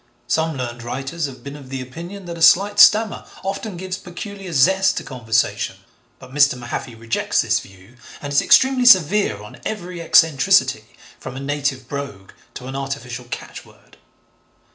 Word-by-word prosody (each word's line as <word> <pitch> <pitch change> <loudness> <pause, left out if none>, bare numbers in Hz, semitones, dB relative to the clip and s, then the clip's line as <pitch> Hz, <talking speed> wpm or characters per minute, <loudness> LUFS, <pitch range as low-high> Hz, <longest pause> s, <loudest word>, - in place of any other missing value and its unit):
Some 160 -2 -1
learned 120 -2 -5
writers 135 +6 -4
have 130 -2 -12
been 140 0 -8
of 135 -3 -12
opinion 165 +10 -7
that 170 -1 -6
a 165 - -9
slight 205 +5 +5
stammer 215 +1 +5 0.2
often 195 0 -4
gives 185 +1 -5
peculiar 190 +1 -8
zest 190 +7 +3
to - - -3
conversation, 115 -4 -1 0.4
but 125 - -14
Mr. 140 -3 +4
Mahaffy 120 0 -6
rejects 115 0 -1
this - - +1
view 95 +6 -16 0.2
and 145 -1 -6
is 140 - +4
extremely 260 -1 +4
severe 185 - +4
on 105 - -13
every 180 -5 -5
eccentricity 160 -5 +3 0.3
from - - -8
a - - -5
native 140 -2 -2
brogue 140 -9 -7 0.2
to 125 - -8
an 135 +1 -7
artificial 135 -3 -5
catchword. 120 - -10
140 Hz, 155 wpm, -20 LUFS, 125-185 Hz, 0.4 s, slight